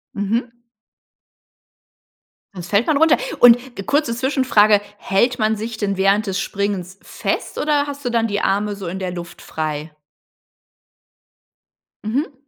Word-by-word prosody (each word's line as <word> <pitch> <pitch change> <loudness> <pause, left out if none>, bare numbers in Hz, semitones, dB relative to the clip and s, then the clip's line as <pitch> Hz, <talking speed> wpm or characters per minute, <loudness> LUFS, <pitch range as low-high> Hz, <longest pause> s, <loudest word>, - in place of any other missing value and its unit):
Mhm. 230 +4 -1 2.0
Sonst 175 -1 -8
fällt 210 +4 +2
man 305 -3 +3
runter. 320 +1 +5 0.2
Und 245 +1 +5
ge 195 - -6
kurze 280 -3 0
Zwischenfrage: 240 -6 +3 0.2
Hält 235 +7 +1
man 220 0 +2
sich 220 +1 -5
denn 200 -2 -2
während 195 +2 +2
des 195 0 -1
Springens 195 -2 -3
fest - - -4
oder 290 -1 +1
hast 285 -1 -7
du 245 - 0
dann 230 -1 +1
die 205 -1 -2
Arme 205 +1 0
so 195 -3 -7
in 190 +3 -4
der 185 -1 -3
Luft 175 -1 -8
frei? 155 0 -4 2.1
Mhm. 275 +7 -1
210 Hz, 140 wpm, -20 LUFS, 195-245 Hz, 2.1 s, runter